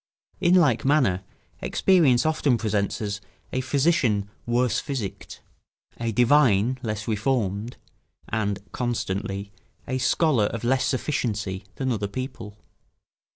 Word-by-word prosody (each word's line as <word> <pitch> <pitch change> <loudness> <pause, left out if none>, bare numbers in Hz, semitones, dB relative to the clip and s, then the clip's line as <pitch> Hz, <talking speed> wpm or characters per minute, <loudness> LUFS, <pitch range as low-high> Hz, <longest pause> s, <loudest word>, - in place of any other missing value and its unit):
In 180 -1 +4
like 145 -11 +4
manner, 130 -10 +3 0.4
experience 160 -11 +3
often 150 -5 +2
presents 105 -2 -1
us 105 0 -3 0.3
a 130 - 0
physician 130 -7 +2 0.2
worse 120 0 +2
physicked, 125 -9 -5 0.6
a 115 -1 -1
divine 125 -1 +4
less 110 -3 -4
reformed, 110 -1 -1 0.5
and 105 -3 -1
(constantly) 100 -4 -3 0.4
a 130 0 -1
scholar 130 -3 +3
of 115 +2 -4
less 130 +2 +2
sufficiency, 105 -9 -2
than 130 -1 -1
other 105 -3 -1
people. 115 -2 -6
120 Hz, 110 wpm, -25 LUFS, 105-130 Hz, 0.6 s, In